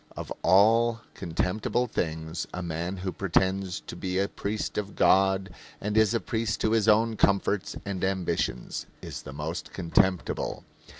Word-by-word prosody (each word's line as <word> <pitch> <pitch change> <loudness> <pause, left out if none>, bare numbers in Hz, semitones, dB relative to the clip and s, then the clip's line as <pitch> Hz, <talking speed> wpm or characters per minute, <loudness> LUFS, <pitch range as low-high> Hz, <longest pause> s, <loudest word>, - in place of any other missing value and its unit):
"Of - - -5
all 115 +5 +4
contemptible 95 +7 -1
things 80 -6 -3
a 90 - -4
man 85 +3 -3
who 95 0 -3
pretends 95 0 0
to - - -9
be 95 -1 -2
a 100 +1 +2
priest 105 +1 -3
of 100 -1 -6
God 95 0 +3 0.3
and 105 +1 -2
is 110 +1 +4
a - - +2
priest 110 -1 -2
to 110 - +2
his 110 -1 +2
own 110 +1 +4
comforts 100 -1 +1
and 100 -2 -3
ambitions 90 -9 -1 0.2
is - - -6
the - - -9
most 75 +4 -5
contemptible." 90 0 0
95 Hz, 155 wpm, -27 LUFS, 90-105 Hz, 0.3 s, all